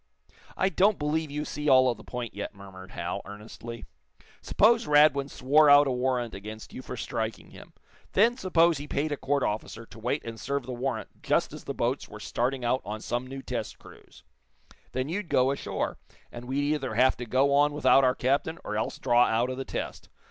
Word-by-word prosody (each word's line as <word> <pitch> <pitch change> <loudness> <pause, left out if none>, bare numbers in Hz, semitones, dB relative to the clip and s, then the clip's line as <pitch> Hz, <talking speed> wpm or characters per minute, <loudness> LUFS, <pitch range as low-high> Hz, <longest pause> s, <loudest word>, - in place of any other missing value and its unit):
"I 190 - +2
don't 200 +2 +3
believe 155 +1 -1
you 150 +1 -3
see 150 0 -2
all 130 -1 +6
of 120 - +1
the 110 - -14
point 125 -2 -6
yet," - - -6
murmured 95 -1 -12
Hal, 85 +1 -4
earnestly. 110 +3 -9 0.6
"Suppose 230 +2 +3
Radwin 145 -2 +4
swore 145 +4 +4
out 145 0 +8
a 135 - 0
warrant 125 -2 -1
against 110 +2 -9
you - - -7
for - - -7
striking 110 -2 -4
him. - - -14 0.4
Then 230 +5 +4
suppose 170 - +3
he 145 - -7
paid 150 +2 -1
a - - 0
court 140 0 -1
officer 110 +2 -3
to 110 - -14
wait 125 +6 -2
and 115 -1 -7
serve 140 +1 -2
the 130 - -6
warrant 120 -3 -4
just - - +1
as - - -10
the - - -4
boats - - -1
were - - -10
starting 125 +1 -2
out 130 +2 +1
on 105 +1 -5
some 120 +3 -3
new 135 +1 -7
test 120 -4 -4
cruise? - - -17 0.7
Then 130 +1 -2
you'd 180 +2 -4
go 130 -2 +3
ashore, 140 - -3 0.3
and 120 0 -9
we'd 145 +3 0
either 135 -4 -3
have 130 +1 +4
to 120 - -6
go 135 +4 +2
on 145 +1 +4
without 145 -2 +4
our 130 0 +3
captain, 140 +6 0
or 105 - -4
else 110 - -2
draw 120 -1 +4
out 115 +3 +1
of 130 - -5
the 135 - -4
test. - - -5
130 Hz, 205 wpm, -27 LUFS, 120-145 Hz, 0.7 s, out